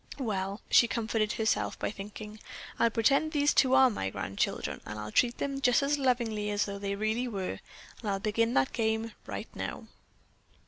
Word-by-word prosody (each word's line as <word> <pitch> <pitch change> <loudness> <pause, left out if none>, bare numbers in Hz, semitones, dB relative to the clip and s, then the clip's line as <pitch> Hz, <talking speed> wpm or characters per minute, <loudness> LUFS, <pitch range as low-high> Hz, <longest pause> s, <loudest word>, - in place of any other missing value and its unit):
"Well," 200 -5 -2
she 235 - +7
comforted 220 -2 0
herself 220 -1 0
by - - -2
thinking, 210 +1 -8 0.4
"I'll 235 - +5
pretend 275 +7 +2
these 290 -1 +3
two 265 -1 +4
are 265 -1 +6
my 95 - -2
grandchildren, 95 +1 -2
and 105 - -7
I'll 105 0 -6
treat 240 - +2
them 275 -1 -3
just 250 0 +4
as 290 +1 +1
lovingly 235 -5 0
as 205 0 +1
though 200 -1 -5
they 200 0 -2
really 220 +4 -1
were, 195 -5 -4 0.4
and 215 - -3
I'll 195 -1 0
begin 225 +3 +1
that 130 - +2
game 220 0 0 0.2
right - - -5
now." - - -5
220 Hz, 180 wpm, -30 LUFS, 205-245 Hz, 0.4 s, she